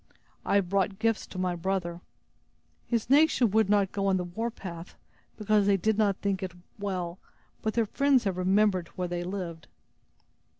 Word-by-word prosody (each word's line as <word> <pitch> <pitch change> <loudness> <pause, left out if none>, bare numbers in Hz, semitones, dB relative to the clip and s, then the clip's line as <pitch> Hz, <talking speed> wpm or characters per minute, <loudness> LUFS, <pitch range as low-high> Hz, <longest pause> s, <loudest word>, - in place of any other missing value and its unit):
"I - - 0
have 200 -3 +3
brought 195 0 +1
gifts 225 0 0
to - - -10
my 185 -1 0
brother. 175 -1 -2 0.9
His 235 -3 0
nation 275 -4 +4
would 220 -1 +3
not 200 -2 +3
go 195 -1 -1
on 190 -1 +3
the 180 - -1
warpath, 180 -3 -6 0.4
because 210 -1 +2
they 200 -1 +4
did 215 +4 +1
not 205 -2 +2
think 200 -1 -1
it 185 -2 -4 0.3
well, 185 -3 -3 0.4
but 220 - -2
their 230 -1 +3
friends 275 +3 +2
have 195 -4 -1
remembered 190 -1 +2
where 180 -1 -2
they 175 0 -3
lived." 175 -3 -5
195 Hz, 170 wpm, -28 LUFS, 180-215 Hz, 0.9 s, nation